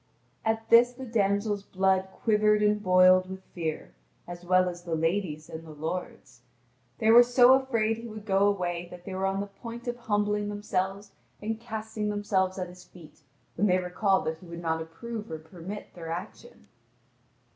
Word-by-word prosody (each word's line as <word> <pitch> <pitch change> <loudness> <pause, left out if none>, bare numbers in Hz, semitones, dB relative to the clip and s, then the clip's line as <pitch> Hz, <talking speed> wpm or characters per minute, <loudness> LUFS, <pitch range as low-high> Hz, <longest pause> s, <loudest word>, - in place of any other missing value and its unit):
At 225 0 -1
this 240 +1 +7
the 260 +1 -8
damsel's 205 -2 0
blood 190 -1 +1 0.2
quivered 210 -1 +3
and 210 0 +2
boiled 185 -1 +5
with 190 0 -8
fear, 160 -3 -4 0.3
as 175 0 -8
well 185 +1 +3
as 175 -1 -5
the 170 -2 -3
lady's 165 -1 -1
and 160 0 -8
the 165 - -13
lord's. 160 +4 -6 0.6
They 220 -1 +3
were 235 +1 +10
so 245 +1 +6
afraid 230 -5 +1
he 230 +1 -8
would 215 -2 -9
go 195 -1 +3
away 175 -3 -1
that 180 0 -12
they 195 - -6
were 190 +1 0
on 195 +1 -1
the - - -3
point 230 +4 -10
of 240 0 -2
humbling 210 -2 0
themselves 200 -1 -3 0.3
and 220 +1 -3
casting 220 -2 -4
themselves 195 -2 0
at 180 -1 -3
his 180 0 -13
feet, 170 -4 -16 0.3
when 210 - +1
they 185 -1 +4
recalled 185 +2 +1
that 160 0 -3
he 180 - -14
would 170 0 -8
not 160 0 0
approve 215 +7 -7
or 160 - -4
permit 175 +5 -9
their 165 -2 -8
action. 180 - -8
195 Hz, 180 wpm, -28 LUFS, 180-215 Hz, 0.6 s, were